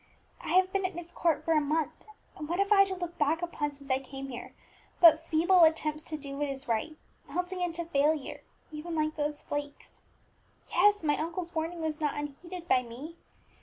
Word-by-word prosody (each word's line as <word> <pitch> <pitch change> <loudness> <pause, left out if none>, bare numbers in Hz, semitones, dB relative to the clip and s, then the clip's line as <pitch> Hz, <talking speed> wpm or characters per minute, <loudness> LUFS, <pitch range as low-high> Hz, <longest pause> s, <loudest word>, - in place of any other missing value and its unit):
"I - - -2
have 370 0 +4
been 390 0 +1
at 370 -1 -2
Myst 350 0 -8
Court 330 -4 +1
for 330 - +3
a 305 - +4
month, 300 +1 -1 0.3
and 300 - -7
what 345 - 0
have 400 +1 +1
I 395 -1 +7
to 380 -1 -4
look 350 -1 -6
back 315 +3 +2
upon 295 -4 -2
since 280 -1 -9
I 260 - +3
came 270 0 -8
here 245 -1 -8 0.4
but 325 -1 +7
feeble 345 +3 +5
attempts 310 -1 +2
to 310 - -5
do 280 -2 -7
what 290 0 0
is 275 +1 -6
right, 235 +7 -1 0.3
melting 360 +1 -3
into 340 -1 -2
failure, 295 -2 0 0.3
even 320 +2 -5
like 310 0 0
those 295 -1 -2
flakes? 290 0 -6 0.7
Yes, 415 -3 +4
my 295 -1 +2
uncle's 335 +2 -4
warning 330 +1 -3
was 315 -1 -3
not 295 -1 0
unneeded 335 +5 -7
by 255 - +4
me. 255 +7 -9
315 Hz, 200 wpm, -30 LUFS, 290-345 Hz, 0.7 s, I